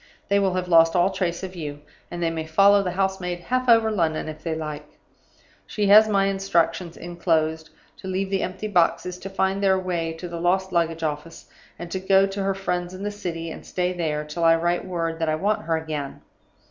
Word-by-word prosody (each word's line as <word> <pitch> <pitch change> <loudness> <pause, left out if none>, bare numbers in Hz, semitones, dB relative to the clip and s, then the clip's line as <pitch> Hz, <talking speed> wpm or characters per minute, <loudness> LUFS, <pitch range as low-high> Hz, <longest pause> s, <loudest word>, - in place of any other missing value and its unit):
They 200 0 +4
will 190 -2 +1
have 180 -1 -2
lost 165 -1 +5
all 180 +2 +3
trace 185 -2 -2
of 185 0 -6
you; 145 -3 -6 0.3
and 175 0 -4
they 165 - +1
may 160 -1 -4
follow 200 +5 +5
the 190 - -2
house 190 +1 -1
maid 180 -1 -3
half 255 +6 -1
over 225 -1 +5
London, 165 -7 0
if 155 0 -7
they 160 -1 -3
like. 150 -1 -7 0.7
She 210 - -1
has 215 +2 +8
my 195 -2 +3
instructions 180 -3 0
(inclosed) 160 -2 -1 0.3
to 190 - -9
leave 190 +1 -2
the 195 - +1
empty 185 +3 -4
boxes 180 -1 +1
to 195 - -7
find 190 0 0
their 190 -1 +3
way 175 -3 -2
to 165 +2 -7
the 170 -1 -6
lost 190 +2 +1
luggage 165 -2 0
office 155 +2 -5 0.3
and 175 -1 -8
to 190 - -2
go 190 +1 +4
to 195 +1 -4
her 195 0 0
friends 180 -2 -3
in 190 - -8
the 205 - -2
City, 165 -5 -5
and - - -9
stay 180 0 -2
there 155 -4 -2
till 150 +3 -4
I 165 0 +6
write 175 +1 0
word 165 -3 -3
that 165 -1 0
I 155 - +1
want 205 +5 -1
her 165 -1 +1
again. 155 -3 -5
175 Hz, 220 wpm, -24 LUFS, 165-195 Hz, 0.7 s, has